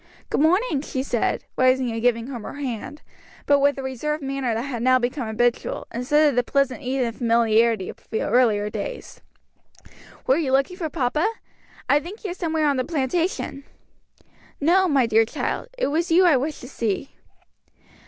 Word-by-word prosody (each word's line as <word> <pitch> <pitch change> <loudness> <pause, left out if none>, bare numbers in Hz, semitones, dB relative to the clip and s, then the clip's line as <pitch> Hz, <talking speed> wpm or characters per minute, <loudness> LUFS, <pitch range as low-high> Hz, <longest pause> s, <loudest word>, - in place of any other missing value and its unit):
"Good - - +1
morning," 330 - +2
she 265 -3 -3
said, 240 -4 -1
rising 255 -1 +3
and 225 0 -4
giving 230 -1 +1
him 250 -3 -6
her - - -8
hand; 280 +1 -5 0.4
but 285 0 +4
with 285 0 +3
the 270 - -6
reserved 295 +4 -3
manner 270 -4 -2
that 230 - -2
had 255 -4 -4
now 255 +1 +4
become 250 0 -2
habitual, 235 +2 -1
instead 295 +6 +3
of 285 - +1
the 245 - +4
pleasant 275 +1 0
ease 260 0 -1
and 230 -1 -4
familiarity 230 -3 +2
of - - -9
earlier 220 -2 +2
days; - - -6 1.0
"were 265 - +3
you 285 -5 -1
looking 275 +7 +1
for 330 -5 -3
papa? 300 - 0 0.6
I 285 - +4
think 355 +9 -10
he 415 - -4
is 355 - -6
somewhere 320 -3 0
on 285 -2 +2
the 255 - +1
plantation." 320 0 -2 1.0
"No, 365 +6 +4
my 275 -6 +3
dear 225 0 +4
child, 225 - -3
it - - 0
was 330 +4 0
you 355 +3 +5
I 335 -5 +6
wished 285 +4 -2
to 250 - -9
see." 230 -2 -3
270 Hz, 180 wpm, -23 LUFS, 240-305 Hz, 1.0 s, I